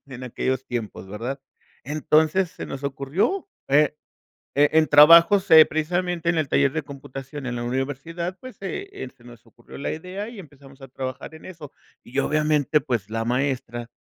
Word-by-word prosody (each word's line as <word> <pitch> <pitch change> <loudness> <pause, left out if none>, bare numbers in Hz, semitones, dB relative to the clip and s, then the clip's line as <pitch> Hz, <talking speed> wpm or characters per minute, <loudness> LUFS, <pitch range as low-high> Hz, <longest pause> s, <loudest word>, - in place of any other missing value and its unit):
en 130 -1 -9
aquellos 130 +1 -2
tiempos, 115 -5 -5
¿verdad? 120 +7 -5 0.4
Entonces, 155 +5 +2
se - - -8
nos 135 - -7
ocurrió, 145 - -1 0.2
eh, 150 +2 +3 0.6
e 145 +1 +5
en 160 0 +4
trabajos, 170 +6 +7
eh, 160 -1 +10
precisamente 175 +2 -1
en 170 - +1
el 155 - 0
taller 140 -1 +3
de 160 +1 -3
computación 135 0 -9
en 125 -1 -3
la 120 - -4
universidad 145 +8 -3
pues 255 -3 -10
se 390 - -6 0.3
se 120 - -22
nos 120 -2 -15
ocurrió 120 +1 -15
la 140 - -3
idea 185 +6 -6
y 235 -3 -11
empezamos 140 -5 -15
a 135 - -10
trabajar 130 +4 -7
en 160 - -14
eso 165 -6 -10 0.3
y 125 - -9
obviamente 150 0 +2
pues 120 -8 -3
la 115 0 -1
maestra 120 -1 -2
145 Hz, 170 wpm, -23 LUFS, 130-160 Hz, 0.6 s, eh